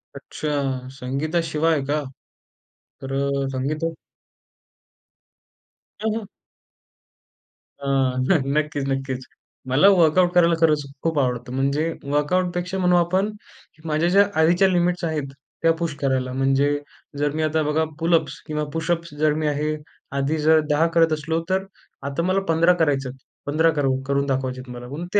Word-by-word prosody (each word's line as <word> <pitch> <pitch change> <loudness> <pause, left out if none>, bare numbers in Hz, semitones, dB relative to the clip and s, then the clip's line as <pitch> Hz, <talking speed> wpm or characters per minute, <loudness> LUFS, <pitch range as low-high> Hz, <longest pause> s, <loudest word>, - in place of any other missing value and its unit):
अच्छा. 135 -4 -3
संगीताशिवाय 155 +3 0
का? 150 +1 -1 1.0
तर 135 0 -6
अ, 140 0 0
संगीता 140 +5 -2 2.1
हं, 220 -1 0
हं. 225 - -4 1.6
अ, 140 - -5 0.3
न 140 +5 +2 0.2
नक्कीच 150 -2 -1
नक्कीच. 135 -1 -2 0.5
मला 145 +10 +5
वर्कआउट 175 +2 +4
करायला 170 -1 +5
खरंच 155 -2 +3 0.2
खूप 160 -2 +1
आवडतं. 125 -1 -1
म्हणजे 140 +5 0 0.2
वर्कआउटपेक्षा 180 +4 0
म्हणू 180 -1 +3
आपण 185 +4 +2 0.5
की 155 - -22
माझ्या 155 +3 +1
ज्या 200 +2 +5 0.2
आधीच्या 175 +4 +4
लिमिट्स 180 -1 +1
आहेत, 150 -4 -3 0.3
त्या 165 - +5
पुश 165 -4 -2
करायला. 130 -2 0
म्हणजे 135 +2 +2 0.4
जर 145 0 +1
मी 155 - 0
आता 155 +1 +1
बघा 150 +2 +1 0.2
पुलअप्स 165 -2 +1
किंवा 150 0 -2
पुशअप्स 170 0 -2
जर 155 -1 +3
मी - - +1
आहे 150 +1 0 0.4
आधी 140 +3 0
जर 155 +1 +5
10 150 +3 +3
करत 165 -1 +4
असलो, 160 +2 -1
तर 190 +1 0 0.4
आता 145 +4 -2
मला 185 +2 +2
15 170 +2 +4
करायचे 140 -3 +1
आहेत. 130 - -10 0.3
15 155 +3 +3
करू 135 -3 +1
करून 140 0 +1
दाखवायचे 130 -2 -2
आहेत 125 -1 -10
मला 120 0 -8
म्हणून 155 +6 -6
ते 205 - +5
155 Hz, 145 wpm, -23 LUFS, 140-170 Hz, 2.1 s, मला